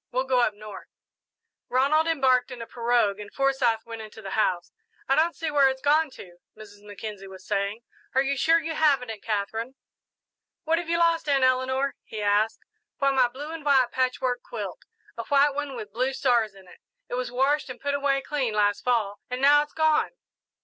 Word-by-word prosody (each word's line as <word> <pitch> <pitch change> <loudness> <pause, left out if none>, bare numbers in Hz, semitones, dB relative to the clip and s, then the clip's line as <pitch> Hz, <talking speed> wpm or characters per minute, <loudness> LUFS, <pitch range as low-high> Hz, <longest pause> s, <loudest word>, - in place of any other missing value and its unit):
We'll 255 +1 0
go 260 -1 +1
up 220 -4 +2
north." 215 0 -10 0.8
Ronald 285 +5 +3
embarked 260 -6 +2
in 250 -2 -8
a 230 - -6
pirogue 230 -4 +1
and 205 -1 -9
Forsyth 265 -5 +1
went 230 -1 -7
into 215 0 -11
the 195 -3 -8
house. 180 -5 0 0.4
"I 270 - +3
don't 325 +4 +2
see 325 -2 -3
where 280 -2 +5
it's 265 0 -4
gone 300 +3 +3
to," 175 -2 -12 0.2
Mrs. 205 -1 -14
Mackenzie 205 -1 -8
was 190 -1 -12
saying. 200 +2 -2 0.3
"Are 265 - +4
you 275 0 -1
sure 325 +5 +3
you 325 0 -4
haven't 280 -7 +2
it, 215 - -9
Katherine?" 225 +4 -3 0.9
"What 330 0 +1
have 345 -2 -6
you 335 - +2
lost, 335 -2 +2
Aunt 275 -2 +3
Eleanor?" 260 +2 +1
he 220 - -8
asked. 210 +2 +1 0.4
"Why, 275 0 +2
my 260 -2 +4
blue 280 +6 -8
and 325 -2 -7
white 265 -4 +3
patchwork 255 -1 -1
quilt 205 -6 -7 0.3
a - - -2
white 285 +1 +4
one 285 -1 -4
with 210 -4 -8
blue 255 +4 0
stars 240 -6 +1
in 190 -1 -16
it. - - -16 0.3
It - - -8
was 250 -1 -2
washed 270 +4 +1
and 255 - -8
put 285 0 -2
away 280 -1 +1
clean 260 -7 -2
last 205 -1 +1
Fall, 220 -5 0
and 250 0 -3
now 290 +2 +6
it's 295 - -6
gone." 315 -1 +2
255 Hz, 200 wpm, -26 LUFS, 215-280 Hz, 0.9 s, now